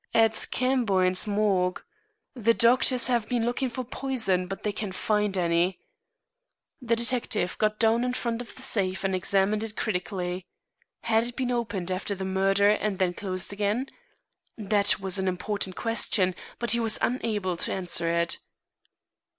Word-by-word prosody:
"At 225 -1 +4
Camboin's 205 -8 +1
morgue. 200 -3 +1 0.5
The 230 -2 +2
doctors 250 +1 +4
have 240 -3 0
been 240 -2 0
looking 250 +2 -1
for 255 +2 -5
poison, 235 -8 0
but 195 +1 -7
they 210 - 0
can't 200 -2 -5
find 210 -2 0
any." 175 +1 +1 1.0
The 235 -2 +1
detective 235 -6 0
got 215 0 +1
down 225 +2 +3
in 250 0 -1
front 235 -1 -2
of 245 - -10
the 260 - -7
safe 190 -7 0
and 195 -1 0
examined 195 +3 +1
it 220 -1 -5
critically. 180 -2 -3 0.6
Had 225 0 +2
it 240 0 -7
been 255 -1 -1
opened 205 -7 -2
after 190 +2 -2
the 190 0 -5
murder 195 +2 +3
and 210 -1 -1
then 185 -2 +1
closed 185 0 -3
again? 210 +6 -1 0.7
That 205 -1 +2
was 190 0 0
an 190 - -1
important 185 +1 -2
question, 215 -4 +1 0.2
but 240 - 0
he 235 - +4
was 225 -2 +1
unable 215 -7 -1
to - - -1
answer 175 -3 0
it. 170 - -2
210 Hz, 160 wpm, -27 LUFS, 190-235 Hz, 1.0 s, At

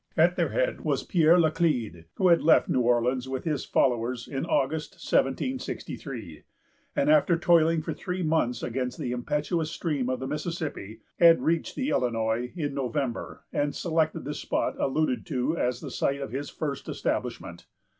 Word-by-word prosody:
At - - +4
their - - +1
head - - -1
was - - 0
Pierre 170 -2 +4
Laclede, 155 - +1
who 185 - +3
had 170 - +5
left 165 - +5
New - - +1
Orleans 125 +2 +1
with 130 -1 -3
his 150 -4 -2
followers 120 -1 0
in 135 -1 -3
August, 155 +6 0
1763; 185 - -2 0.5
and, 285 -1 +1
after 250 - +4
toiling 165 -2 +3
for - - -3
three 180 0 -4
months 155 -7 0
against 125 +1 -3
the 130 -6 -3
impetuous 150 +6 -1
stream 145 -7 -2
of 130 -1 -1
the 130 - -4
Mississippi, 150 - -4 0.2
had 165 -1 +7
reached 165 +1 0
the 270 +1 -1
Illinois 115 0 0
in 145 -5 -2
November, 130 -2 -3
and 145 0 0
selected 160 -2 0
the 145 - -3
spot - - -1
alluded 135 -2 0
to 135 +1 0
as 125 -5 -1
the - - -6
site 140 0 0
of 135 -5 -5
his 140 +3 -4
first 145 -3 -4
establishment. - - -3
145 Hz, 165 wpm, -27 LUFS, 125-165 Hz, 0.5 s, had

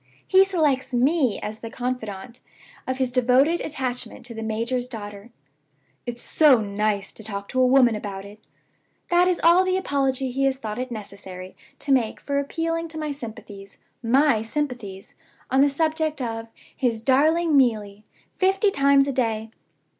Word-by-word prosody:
he 380 0 +6
selects 300 -9 0
ME 265 -1 +2
as 215 +1 -5
the 230 - -7
confidante 245 -2 -5 0.5
of 260 0 -2
his 260 -2 0
devoted 255 +7 +3
attachment 255 -6 -4
to 240 - -6
the 225 - -6
major's 230 +3 -2
daughter! 205 -2 -8 0.8
'It's 240 0 -5
so 295 -6 +5
nice 205 -1 -2
to 220 - -11
talk 200 -2 -5
to 255 - 0
a 255 - +5
woman 250 -2 +5
about 200 -2 -6
it!' 205 +1 -13 0.7
That 350 +1 +4
is 365 -1 +1
all 340 +3 +6
the 370 0 +1
apology 270 -6 -1
he 275 +2 0
has 270 -1 +1
thought 220 -3 -5
it 255 0 -3
necessary 195 -4 -9 0.2
to 280 - -3
make 245 -5 +2
for 280 0 -1
appealing 330 +3 -2
to 315 0 -8
my 305 -1 -3
sympathies 220 -7 -9 0.2
my 255 0 +3
sympathies! 225 -6 -5 0.4
on 265 +1 +4
the 285 - +5
subject 310 +1 -1
of 225 -2 -4 0.3
'his 235 -4 -1
darling 310 +5 +3
Neelie,' 215 -6 +1 0.3
fifty 390 +2 +2
times 280 -3 +4
a - - 0
day. 225 -3 -1
255 Hz, 160 wpm, -24 LUFS, 220-285 Hz, 0.8 s, he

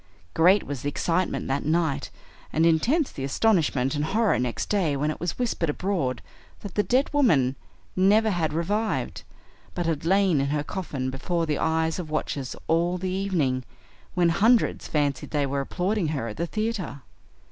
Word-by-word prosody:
Great 185 +5 +5
was 140 -3 -5
the 145 - -1
excitement 170 +5 -1
that 135 +1 -1
night, 155 -3 0 0.4
and 160 +1 +2
intense 245 - +2
the 135 - -6
astonishment 140 - +2
and 145 -1 -1
horror 210 +6 +2
next 125 -1 -2
day 180 -8 +1
when 150 +2 0
it - - -7
was 175 0 -3
whispered 230 -9 -1
abroad 145 - -1 0.4
that 205 - -7
the 210 - +2
dead 255 +6 +2
woman 145 - +3 0.4
never 210 +4 +4
had 165 -5 0
revived, 205 +8 -1 0.5
but 175 - -1
had 160 -3 -1
lain 185 -3 +3
in 140 - 0
her 145 +1 -1
coffin 145 -7 -4
before 165 +6 -1
the 150 -2 -1
eyes 160 +1 0
of 165 -4 -5
watchers 145 -3 -3
all 170 +2 +2
the 185 0 -3
evening, 170 -10 0 0.5
when 175 -1 +3
hundreds 220 +8 +3
fancied 145 -3 -1
they 145 -2 0
were 140 0 -1
applauding 185 +5 -1
her 140 -6 -2
at 105 - -8
the 170 - -1
theater. 215 - -3
165 Hz, 170 wpm, -25 LUFS, 145-195 Hz, 0.5 s, Great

